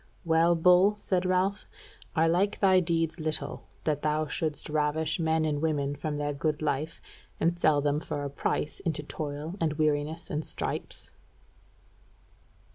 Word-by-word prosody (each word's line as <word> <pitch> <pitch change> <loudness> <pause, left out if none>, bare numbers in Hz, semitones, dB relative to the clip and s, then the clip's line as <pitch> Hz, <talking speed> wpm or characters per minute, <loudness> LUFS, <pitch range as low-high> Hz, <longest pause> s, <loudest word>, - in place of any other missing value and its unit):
"Well, 165 +1 +4
Bull," 180 +4 +5
said 185 -3 0
Ralph, 185 +2 +1 0.5
"I 160 0 +4
like 180 +5 +2
thy 190 -2 +5
deeds 165 -1 0
little, 155 -1 -3 0.2
that 150 -2 0
thou 155 0 +1
shouldest 150 0 -3
ravish 155 +2 0
men 160 -1 +2
and 145 -2 -1
women 145 -3 0
from 150 +1 -3
their 145 0 -1
good 150 +2 -1
life, 150 +2 -1 0.4
and 170 +1 +1
sell 155 -3 +4
them 145 +1 +1
for 145 -2 -4
a 140 - -3
price 145 +1 -2
into 160 -5 -2
toil 150 +2 -5
and 160 -2 +1
weariness 155 +1 -1
and 150 +1 -1
stripes." - - -3
155 Hz, 150 wpm, -28 LUFS, 150-170 Hz, 0.5 s, Bull